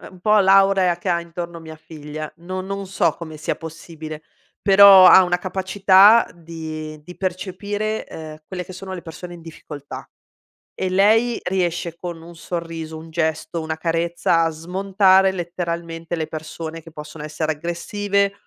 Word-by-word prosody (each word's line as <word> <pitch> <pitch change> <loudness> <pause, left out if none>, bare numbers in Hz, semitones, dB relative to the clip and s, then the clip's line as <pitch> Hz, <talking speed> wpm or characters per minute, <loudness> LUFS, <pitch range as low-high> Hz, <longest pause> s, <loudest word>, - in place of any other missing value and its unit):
è - - -12
un 185 - -16
po' 210 +3 +4
l'aurea 195 -2 +4
che 175 +2 -6
ha 170 -1 +1
intorno 170 0 -7
mia 160 -1 -10
figlia. 155 -1 -8
No 185 +2 -6
non 195 +1 -5
so 185 -4 +1
come 160 -2 -8
sia 150 - -2
possibile, 160 -1 -9 0.4
però 195 -1 +9
ha 190 - +9
una 180 -1 +1
capacità 190 +3 +5
di 160 -2 -7
di 180 +2 -11
percepire, 200 +3 -3
ehm, 155 -1 -9
quelle 180 -1 -5
che 185 - -11
sono 190 +1 -7
le 175 - -7
persone 175 +1 -9
in 170 - -12
difficoltà. 150 -3 -10 0.7
E 185 - -1
lei 220 +5 +3
riesce 175 -2 -2
con 170 -1 -7
un 170 +1 -12
sorriso, 165 -2 -6
un 160 +1 -11
gesto, 160 +1 -2
una 160 0 -4
carezza 165 +1 0
a 165 - +1
smontare 190 +3 +2
letteralmente 170 -2 -4
le 160 -2 -3
persone 160 +1 -7
che 165 - -14
possono 150 0 -9
essere 155 +1 -2
aggressive, 200 +5 -1
170 Hz, 160 wpm, -21 LUFS, 160-190 Hz, 0.7 s, però